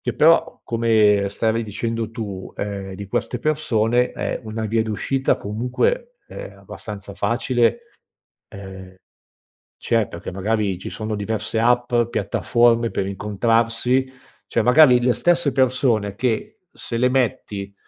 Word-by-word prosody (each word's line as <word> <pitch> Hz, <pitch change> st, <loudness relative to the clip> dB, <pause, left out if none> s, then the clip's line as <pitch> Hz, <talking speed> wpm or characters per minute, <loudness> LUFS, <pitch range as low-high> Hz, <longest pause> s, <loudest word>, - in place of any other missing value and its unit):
che -, -, -2 dB
però, 165 Hz, +2 st, +3 dB
come 110 Hz, -3 st, +3 dB
stavi 110 Hz, +3 st, 0 dB
dicendo 115 Hz, +1 st, -3 dB
tu, 100 Hz, -5 st, -6 dB
ehm, 100 Hz, -2 st, -5 dB
di 100 Hz, +1 st, -7 dB
queste 120 Hz, +5 st, -2 dB
persone, 125 Hz, -5 st, +1 dB
ehm, -, -, -3 dB
una 110 Hz, 0 st, -4 dB
via 110 Hz, +1 st, +1 dB
d’uscita 120 Hz, +5 st, 0 dB
comunque, 125 Hz, -, -2 dB
ehm, -, -, -9 dB
abbastanza 100 Hz, -2 st, -9 dB
facile, 120 Hz, -, +1 dB, 0.7 s
ehm, 95 Hz, -1 st, -11 dB, 0.8 s
c'è, 115 Hz, -3 st, 0 dB
perché 85 Hz, +3 st, -8 dB
magari 100 Hz, 0 st, -1 dB
ci 95 Hz, -, -7 dB
sono 110 Hz, 0 st, -4 dB
diverse 110 Hz, +2 st, -3 dB
app, 120 Hz, +1 st, +2 dB, 0.2 s
piattaforme 115 Hz, +3 st, +2 dB
per 95 Hz, -, -2 dB
incontrarsi. 115 Hz, +5 st, +1 dB, 0.4 s
Cioè, 115 Hz, -, +1 dB
magari 125 Hz, +1 st, +6 dB
le 125 Hz, 0 st, +3 dB
stesse 170 Hz, -2 st, +2 dB
persone 125 Hz, -6 st, +1 dB
che, 115 Hz, -1 st, -2 dB
se 115 Hz, -, -6 dB
le 125 Hz, +2 st, +3 dB
metti 105 Hz, -6 st, -2 dB
115 Hz, 130 wpm, -21 LUFS, 100-125 Hz, 0.8 s, magari